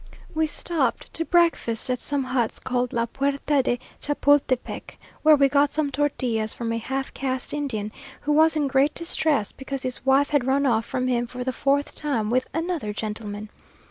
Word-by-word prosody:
We 315 0 +1
stopped 300 -5 -1
to 330 - 0
breakfast 335 -10 +2
at 250 -1 -1
some 285 -2 -1
huts 255 -3 -1
called 250 -1 -1
La 230 0 +1
Puerta 280 +3 0
de 245 -1 0 0.2
Chapultepec, 285 -3 +1 0.2
where 310 0 +7
we 280 -1 +5
got 285 +1 +3
some 300 -2 0
tortillas 255 -6 0
from 230 -1 -3
a 230 - -1
halfcaste 265 +1 -3
Indian, 240 -8 -2 0.3
who 295 - -1
was 315 +2 +5
in 295 -2 +1
great 275 +2 +2
distress, 315 - 0
because 270 0 -6
his 255 -1 -4
wife 270 +2 +3
had 280 -4 +2
run 275 +2 +2
off 230 -3 +2
from 255 - -1
him 240 -1 +1
for 250 +1 -5
the 260 0 -2
fourth 280 +2 +1
time 230 -8 -1
with 255 +1 +1
"another 325 -10 -2
gentleman!" 210 -1 -5
270 Hz, 175 wpm, -24 LUFS, 240-290 Hz, 0.3 s, where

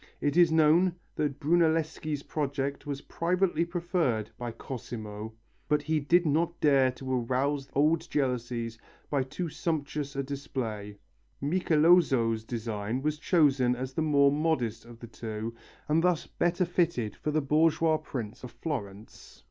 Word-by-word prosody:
It 145 0 0
is 175 -2 +6
known 165 +3 +4 0.2
that 145 -2 -1
Brunelleschi's 160 -2 +1
project 140 -1 -3
was 140 -1 -3
privately 175 -1 0
preferred 170 - -1
by 120 -1 -5
Cosimo, 110 -3 -7 0.3
but 150 -1 +2
he 155 +1 +1
did 170 +5 +3
not 165 +3 +1
dare 135 -3 +4
to 130 -1 -2
arouse 135 +3 -1
old 155 +3 +2
jealousies 120 -4 -2 0.3
by 140 -2 +2
too 150 +7 -4
sumptuous 150 -2 -3
a 140 - -1
display. 115 -7 -5 0.4
Michelozzo's 150 -7 +3
design 110 +1 -3
was 150 0 -1
chosen 140 -8 +3
as 130 +1 -5
the 160 - -1
more 140 -3 +4
modest 145 -8 0
of 120 -1 -12
the 120 - -10
two 110 -1 -5 0.3
and 155 +2 +3
thus 180 -3 +2
better 175 +1 0
fitted 165 - 0
for - - -4
the 155 +1 +2
"bourgeois 155 +2 +3
prince" 125 -9 -6
of 125 - -6
Florence. 115 -6 -7
140 Hz, 140 wpm, -29 LUFS, 120-160 Hz, 0.4 s, is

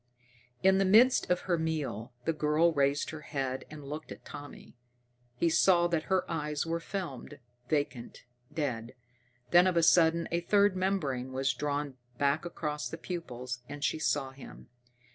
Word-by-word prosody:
In 190 0 +5
the - - +4
midst 225 +7 +5
of 180 0 +2
her 175 -3 0
meal 150 -8 -3
the 165 - +1
girl 155 +2 +2
raised 140 -1 +1
her 155 -1 -8
head 135 -3 -3
and 150 -2 -10
looked 150 +3 -7
at - - -10
Tommy. 145 -3 -10 0.6
He 170 - +1
saw 175 +1 +4
that 165 -2 -1
her 190 -1 +2
eyes 150 -2 -2
were 165 0 -1
filmed, 165 -6 -6 0.3
vacant, 145 -7 -2 0.3
dead. 125 -6 -3 0.6
Then 175 +1 +7
of 180 -2 +1
a 170 - +4
sudden 170 0 +4
a 170 - +1
third 200 +2 +3
membrane 145 -10 -1
was 135 +1 +1
drawn 145 0 -3 0.2
back 140 +4 +1
across 150 -3 -4
the 165 - -6
pupils, 125 -8 -5
and 145 0 -7
she 145 +2 0
saw 140 -3 0
him. 135 0 -13
155 Hz, 160 wpm, -30 LUFS, 140-170 Hz, 0.6 s, Then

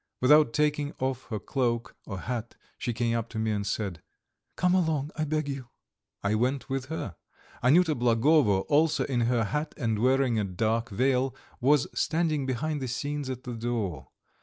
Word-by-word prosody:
Without 150 0 +6
taking 150 +2 0
off 130 -1 -2
her 110 - -3
cloak 120 0 -1
or 95 -3 -5
hat, 120 -2 -4 0.2
she 120 - -1
came 115 0 0
up 115 0 -2
to 115 - -7
me 110 0 0
and 100 -1 -2
said: 100 -5 -3 0.5
"Come 180 0 +2
along, 160 -5 +1
I 155 - -1
beg 155 0 -1
you." 135 -3 -5 0.6
I 100 +1 +1
went 125 +6 0
with 135 -1 -1
her. 145 - -5 0.5
Anyuta 160 +6 +5
Blagovo, 120 -3 +3
also 155 +7 +2
in 125 -3 0
her 120 -2 +2
hat 150 +7 -2
and 115 -6 0
wearing 130 -1 +3
a - - +1
dark 110 +5 -1
veil, 130 +4 +1 0.2
was 140 +2 +4
standing 155 -4 0
behind 145 +4 -1
the 130 - -2
scenes 145 +2 -3
at 130 -1 -5
the 125 - -5
door. 110 - -3
130 Hz, 175 wpm, -28 LUFS, 115-145 Hz, 0.6 s, Without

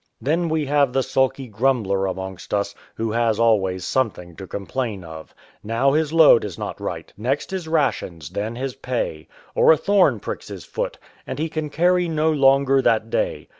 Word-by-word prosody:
Then 165 +4 0
we 155 -1 0
have 140 -2 +2
the 135 - +2
sulky 130 +1 0
grumbler 110 -4 0
amongst 95 +1 -5
us, 100 0 -1 0.2
who 110 -1 -2
has 115 -1 +1
always 95 -6 +2
something 95 -10 -2
to 95 - -8
complain 105 0 -4
of. 80 -1 -11 0.3
Now 115 +6 +1
his 155 +1 +1
load 160 -7 +6
is 100 -5 -6
not - - -6
right, - - -5
next 130 - -2
his 185 -4 -4
rations, 130 - -1
then 110 +3 -3
his 130 +1 -3
pay; 120 -13 -4 0.3
or - - +5
a 160 - +5
thorn 200 +3 +3
pricks - - -6
his - - -8
foot, - - -4 0.3
and - - -4
he 160 +2 -2
can 155 -1 -3
carrry 180 +3 +2
no 160 -1 +1
longer 135 -1 +4
that 115 -2 +1
day. - - -1
130 Hz, 180 wpm, -22 LUFS, 100-150 Hz, 0.3 s, load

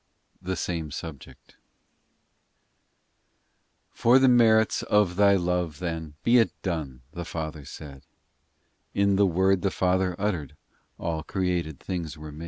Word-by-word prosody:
THE 95 0 -3
SAME 85 -4 -3
SUBJECT 80 -2 -10 2.3
FOR 120 +3 +4
the 135 0 +5
merits 110 -3 +4
of 105 -4 +2
Thy 100 0 +5
love, 90 -3 -1
then, 80 -4 -5
Be 120 +1 +5
it 110 -6 0
done, 75 -9 -3
the 85 +2 -6
Father 80 -3 -6
said; 70 -2 -11 0.9
In 100 0 +3
the 100 0 +4
word 95 +1 +2
the 100 - +1
Father 90 0 +1
uttered 85 -9 -2 0.4
All 80 -2 -3
created 85 -4 -2
things 85 -4 -5
were 75 0 -9
made. 75 - -11
90 Hz, 130 wpm, -26 LUFS, 80-100 Hz, 2.3 s, the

